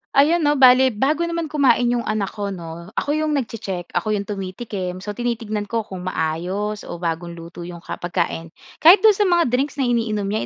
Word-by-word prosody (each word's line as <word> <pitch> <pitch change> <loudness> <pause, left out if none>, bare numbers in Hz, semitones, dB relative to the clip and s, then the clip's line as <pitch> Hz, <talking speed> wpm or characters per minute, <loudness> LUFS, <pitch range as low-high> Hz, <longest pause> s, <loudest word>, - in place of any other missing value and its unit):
Ayan 305 +5 +5
'no 295 -2 +2
bale 260 -1 +7
bago 300 +9 +1
naman 335 -2 -3
kumain 280 -4 +3
'yong 240 -1 -1
anak 215 -2 -1
ko 205 -2 -4
'no, 170 -3 -7
ako - - -2
'yong 310 0 0
nagche-check, 200 -9 -4
ako 210 +5 0
'yong 200 - -2
tumitikim. 190 -2 -5
So 210 - -4
tinitignan 220 -2 -3
ko 225 +1 -1
kung 185 -3 -8
maayos 185 +6 -2
o - - -5
bagong 170 0 -4
luto 170 +1 -9
'yong 175 -1 -9
ka - - -6
pagkain. 175 -2 -2 0.3
Kahit 365 +5 +7
do'n 435 - +8
sa 410 0 +2
mga 345 -8 +3
drinks 270 +4 0
na 280 - -1
iniinom 230 -4 0
niya 215 - 0
215 Hz, 200 wpm, -21 LUFS, 180-270 Hz, 0.3 s, do'n